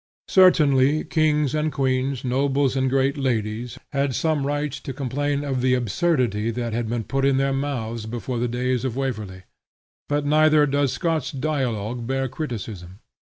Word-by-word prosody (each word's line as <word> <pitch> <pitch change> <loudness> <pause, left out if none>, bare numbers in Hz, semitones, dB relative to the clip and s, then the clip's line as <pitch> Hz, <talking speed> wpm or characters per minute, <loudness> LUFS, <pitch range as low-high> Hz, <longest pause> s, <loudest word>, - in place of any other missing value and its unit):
Certainly, 150 -6 +5
kings 150 -3 +1
and 155 0 0
queens, 130 -2 -1
nobles 135 +1 +1
and 130 0 +1
great 135 +1 +1
ladies, 120 -2 -2 0.2
had 140 -2 0
some 150 0 0
right 145 0 -1
to 135 0 -6
complain 145 +2 -2
of 135 -3 -2
the 130 0 +3
absurdity 120 - 0
that 115 0 -3
had 115 -1 -2
been 115 -1 -2
put 135 +6 -2
in 135 -1 +3
their 135 0 +1
mouths 120 -5 -3
before 120 +1 -4
the 120 - 0
days 125 +1 -1
of 130 -3 -2
Waverley; 110 -9 -4 0.7
but 145 0 0
neither 155 0 +5
does 140 -2 +1
Scott's 160 -6 -1
dialogue 125 -5 -2
bear 135 0 0
criticism. 105 - -6
135 Hz, 160 wpm, -23 LUFS, 120-145 Hz, 0.7 s, Certainly